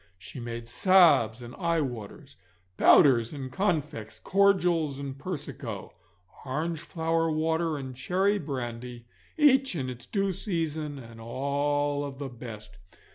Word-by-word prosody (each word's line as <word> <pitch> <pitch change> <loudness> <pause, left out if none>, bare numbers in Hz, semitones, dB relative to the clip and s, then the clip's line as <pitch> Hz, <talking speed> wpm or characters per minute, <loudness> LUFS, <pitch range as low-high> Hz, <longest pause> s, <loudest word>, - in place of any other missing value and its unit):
She 100 +7 -10
made 115 -1 -6
salves 135 - +4
and 120 +1 -9
eyewaters, 140 - -3 0.4
powders 120 - +5
and 135 -3 -6
confects, 150 - -2
cordials 180 -7 +2
and 140 -1 -5
persico, 160 +2 -6 0.5
orangeflower 165 +3 -1
water 160 0 0
and 130 -2 -7
cherry 190 +10 +1
brandy, 120 -5 -5 0.3
each 270 - +4
in 130 -5 -2
its 125 0 -11
due 195 -2 0
season, 160 -6 -2
and 115 -3 -11
all 145 +4 -1
of 140 -2 -6
the 140 -1 -5
best. 110 -4 -10
145 Hz, 120 wpm, -28 LUFS, 125-165 Hz, 0.5 s, powders